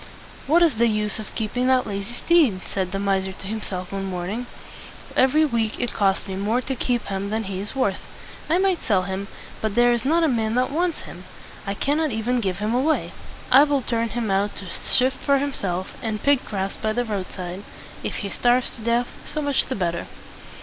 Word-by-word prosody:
"What 335 Hz, +5 st, +5 dB
is 305 Hz, -9 st, +3 dB
the 235 Hz, +1 st, +4 dB
use 210 Hz, -1 st, 0 dB
of 215 Hz, -, -9 dB
keeping 240 Hz, +3 st, -1 dB
that 260 Hz, -1 st, +4 dB
lazy 200 Hz, +2 st, -4 dB
steed?" 280 Hz, -, +3 dB
said 185 Hz, -2 st, -3 dB
the 195 Hz, -, -2 dB
miser 195 Hz, -1 st, 0 dB
to 195 Hz, -, -11 dB
himself 190 Hz, -3 st, -4 dB
one 195 Hz, 0 st, -3 dB
morning. 190 Hz, +6 st, -3 dB, 0.7 s
"Every 290 Hz, +4 st, +5 dB
week 230 Hz, -5 st, -1 dB
it 245 Hz, -, -1 dB
costs 195 Hz, -2 st, +1 dB
me 190 Hz, -, -4 dB
more 210 Hz, +5 st, +1 dB
to 265 Hz, +1 st, -3 dB
keep 245 Hz, -1 st, 0 dB
him 195 Hz, 0 st, -3 dB
than 220 Hz, +1 st, -1 dB
he 195 Hz, -2 st, -4 dB
is 205 Hz, +6 st, -5 dB
worth. 205 Hz, -8 st, +1 dB, 0.5 s
I 330 Hz, -, +4 dB
might 375 Hz, -2 st, +1 dB
sell 195 Hz, -5 st, +2 dB
him; 190 Hz, +1 st, -4 dB, 0.3 s
but 220 Hz, -2 st, -1 dB
there 240 Hz, 0 st, +5 dB
is 235 Hz, -1 st, 0 dB
not 325 Hz, +5 st, +3 dB
a -, -, +5 dB
man 225 Hz, -4 st, 0 dB
that 255 Hz, +2 st, +2 dB
wants 340 Hz, +2 st, 0 dB
him. 180 Hz, +1 st, -10 dB, 0.4 s
I 200 Hz, -, -1 dB
cannot 300 Hz, +7 st, +1 dB
even 240 Hz, +1 st, 0 dB
give 190 Hz, -4 st, -1 dB
him 210 Hz, +3 st, -1 dB
away. 275 Hz, +6 st, +1 dB, 0.4 s
I 270 Hz, +3 st, +9 dB
will 285 Hz, -3 st, +1 dB
turn 230 Hz, -1 st, 0 dB
him 230 Hz, -3 st, -2 dB
out 200 Hz, +1 st, +1 dB
to 195 Hz, -, -6 dB
shift 255 Hz, +8 st, +1 dB
for 280 Hz, 0 st, +2 dB
himself, 195 Hz, -10 st, -2 dB
and 215 Hz, -2 st, -3 dB
pick 280 Hz, -2 st, +3 dB
grass 195 Hz, -1 st, -3 dB
by 215 Hz, 0 st, -1 dB
the 245 Hz, +2 st, 0 dB
roadside. 190 Hz, -3 st, -5 dB, 0.4 s
If -, -, -3 dB
he 200 Hz, -, -4 dB
starves 245 Hz, +1 st, +2 dB
to -, -, -8 dB
death, 235 Hz, +2 st, +1 dB, 0.2 s
so 305 Hz, -, -3 dB
much 285 Hz, -2 st, +1 dB
the 260 Hz, -, -2 dB
better." 170 Hz, -3 st, -2 dB
225 Hz, 210 wpm, -23 LUFS, 195-255 Hz, 0.7 s, I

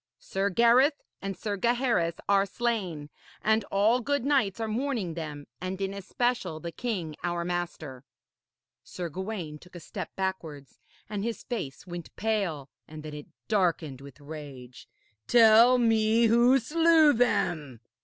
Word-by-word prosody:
Sir 195 Hz, +1 st, -2 dB
Gareth 240 Hz, -, +4 dB, 0.2 s
and 195 Hz, -2 st, -4 dB
Sir 205 Hz, 0 st, -3 dB
Gaheris 235 Hz, -7 st, +1 dB
are 200 Hz, 0 st, +3 dB
slain, 190 Hz, -10 st, -3 dB, 0.3 s
and 220 Hz, 0 st, +2 dB
all 210 Hz, +6 st, +2 dB
good 285 Hz, +1 st, -1 dB
knights 260 Hz, -9 st, +1 dB
are 225 Hz, -, -2 dB
mourning 225 Hz, -6 st, -2 dB
them, 150 Hz, -3 st, -6 dB, 0.2 s
and 185 Hz, +1 st, -4 dB
in 195 Hz, 0 st, -2 dB
especial 230 Hz, -2 st, -2 dB
the 170 Hz, +2 st, -6 dB
king 180 Hz, -9 st, -4 dB
our 175 Hz, -1 st, -2 dB
master.' 170 Hz, -7 st, -4 dB, 0.8 s
Sir 175 Hz, -2 st, -6 dB
Gawaine 180 Hz, -3 st, -5 dB
took 180 Hz, +2 st, -17 dB
a -, -, -7 dB
step -, -, -7 dB
backwards 165 Hz, -8 st, -5 dB, 0.3 s
and 205 Hz, -1 st, -4 dB
his 230 Hz, 0 st, -4 dB
face 180 Hz, -, -5 dB
went 175 Hz, -2 st, -8 dB
pale 195 Hz, -10 st, -1 dB, 0.2 s
and 155 Hz, 0 st, -10 dB
then 155 Hz, -1 st, -7 dB
it 150 Hz, -1 st, -8 dB, 0.2 s
darkened 170 Hz, -, 0 dB
with 140 Hz, 0 st, -13 dB
rage. 140 Hz, -4 st, -10 dB, 0.4 s
'Tell 230 Hz, +2 st, +7 dB
me 225 Hz, -1 st, +3 dB
who 240 Hz, +3 st, +5 dB
slew 315 Hz, +3 st, +4 dB
them?' 160 Hz, -, 0 dB
195 Hz, 145 wpm, -28 LUFS, 160-235 Hz, 0.8 s, Tell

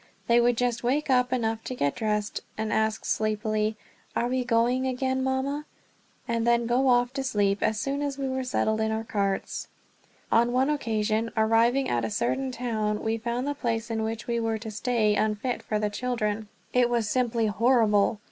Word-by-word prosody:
They 235 Hz, 0 st, +4 dB
would 240 Hz, 0 st, +3 dB
just 245 Hz, -1 st, 0 dB
wake 275 Hz, +4 st, +1 dB
up 250 Hz, -1 st, +3 dB
enough 225 Hz, -3 st, -1 dB
to 255 Hz, -, -4 dB
get 145 Hz, -, 0 dB
dressed 210 Hz, -1 st, -2 dB, 0.2 s
and 220 Hz, -1 st, -2 dB
ask 220 Hz, 0 st, 0 dB
sleepily, 215 Hz, 0 st, 0 dB, 0.4 s
"Are 240 Hz, -, +1 dB
we 255 Hz, 0 st, 0 dB
going 240 Hz, +2 st, +2 dB
again, 260 Hz, +1 st, -1 dB
Mama?" 270 Hz, +3 st, -1 dB, 0.6 s
and 230 Hz, 0 st, 0 dB
then 235 Hz, 0 st, +3 dB
go 250 Hz, +3 st, +2 dB
off 245 Hz, 0 st, +3 dB
to 270 Hz, -1 st, -2 dB
sleep 205 Hz, -6 st, +1 dB
as 220 Hz, 0 st, +1 dB
soon 275 Hz, +4 st, -2 dB
as 285 Hz, -1 st, -2 dB
we 275 Hz, -1 st, -2 dB
were 260 Hz, 0 st, -2 dB
settled 220 Hz, -3 st, 0 dB
in 220 Hz, -, +1 dB
our 220 Hz, 0 st, -2 dB
carts. 200 Hz, -3 st, -2 dB, 0.6 s
On 235 Hz, +1 st, +4 dB
one 265 Hz, +3 st, +2 dB
occasion, 225 Hz, -5 st, 0 dB
arriving 230 Hz, +4 st, +3 dB
at 120 Hz, -1 st, 0 dB
a 110 Hz, -, -1 dB
certain 130 Hz, -, -1 dB
town, 220 Hz, -4 st, -2 dB
we 225 Hz, +1 st, 0 dB
found 240 Hz, +3 st, -2 dB
the 290 Hz, -, -1 dB
place 230 Hz, -4 st, -2 dB
in 220 Hz, -1 st, -1 dB
which 225 Hz, +1 st, -3 dB
we 235 Hz, -1 st, -1 dB
were 225 Hz, -1 st, 0 dB
to 220 Hz, 0 st, -7 dB
stay 215 Hz, 0 st, +1 dB
unfit 215 Hz, +4 st, -1 dB
for 215 Hz, -, -2 dB
the 210 Hz, 0 st, -1 dB
children. 220 Hz, -2 st, -2 dB, 0.3 s
It 250 Hz, -1 st, +4 dB
was 235 Hz, -3 st, 0 dB
simply 235 Hz, 0 st, +1 dB
horrible. 215 Hz, -2 st, +3 dB
230 Hz, 190 wpm, -27 LUFS, 215-250 Hz, 0.6 s, They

